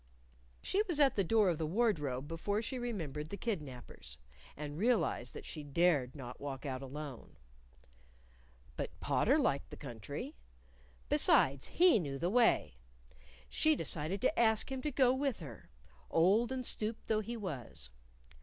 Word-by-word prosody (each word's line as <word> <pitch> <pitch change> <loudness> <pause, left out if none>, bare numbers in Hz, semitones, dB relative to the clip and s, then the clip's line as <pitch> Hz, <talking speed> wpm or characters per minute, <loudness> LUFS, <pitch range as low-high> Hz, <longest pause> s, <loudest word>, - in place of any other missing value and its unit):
_ - - -33 0.6
She 395 - +1
was 340 -5 -1
at 280 -2 +5
the 195 - +2
door 215 +3 +3
of 165 - -3
the 160 - -1
wardrobe 150 - 0
before 170 +6 -1
she 255 +3 -3
remembered 160 - -4
the 200 - -5
kidnapers, 135 - -6 0.4
and 150 +1 -6
realized 200 - +1
that - - -8
she 155 - -6
dared 145 -3 +1
not 125 -3 -8
walk 140 0 -5
out 130 -2 -3
alone. 140 -1 -8 1.4
But - - -5
Potter - - +2
liked - - 0
the - - -9
country. - - -7 0.7
Besides, 135 0 +3
he 350 -9 +5
knew 140 -6 -3
the 175 +5 -1
way. 235 - +3 0.7
She 310 0 +3
decided 170 - -2
to 285 +2 +1
ask 220 +1 +3
him 265 -1 -3
to 300 - -2
go 255 -2 +4
with 270 -3 -1
her 135 - -10 0.4
old 205 +9 +3
and 260 -1 -3
stooped 220 0 -1
though 215 -1 +1
he 235 +2 -5
was. 135 - -6
175 Hz, 155 wpm, -34 LUFS, 145-235 Hz, 1.4 s, at